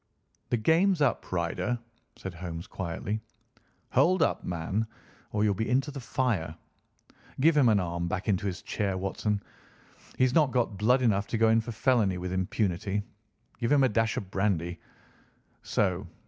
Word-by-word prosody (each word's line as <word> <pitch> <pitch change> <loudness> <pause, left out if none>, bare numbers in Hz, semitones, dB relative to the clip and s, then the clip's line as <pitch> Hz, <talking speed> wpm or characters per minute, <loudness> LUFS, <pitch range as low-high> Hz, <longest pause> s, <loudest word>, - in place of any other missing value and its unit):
"The 120 - +2
game's 165 - +3
up, - - 0
Ryder," 90 +7 -1 0.4
said 95 - -7
Holmes 85 -1 -6
quietly. 95 +4 -4 0.7
"Hold 185 -1 +4
up, - - 0
man, 90 +6 -2 0.4
or 105 0 +1
you'll 105 -1 +3
be 110 +4 -2
into 135 +3 +1
the 140 - -6
fire! 115 -11 -1 0.8
Give 155 +4 +5
him 135 -5 +5
an 105 -2 +4
arm 85 -1 -2
back 90 +4 -3
into 100 -1 +1
his 95 -1 -4
chair, 100 -3 -1
Watson. 100 +2 -2 0.7
He's 130 -1 +3
not 155 -4 +4
got 120 -5 0
blood 125 +6 +3
enough 100 -4 +2
to 115 - -1
go 110 0 +4
in 115 0 +4
for 115 - -6
felony 110 -5 +2
with 90 0 -4
impunity. 95 +1 -1 0.6
Give 120 +2 0
him 145 -2 +5
a 130 - +4
dash 115 0 +1
of 95 -2 -5
brandy. 90 -4 0 0.8
So! 95 -2 0
105 Hz, 160 wpm, -28 LUFS, 95-125 Hz, 0.8 s, Give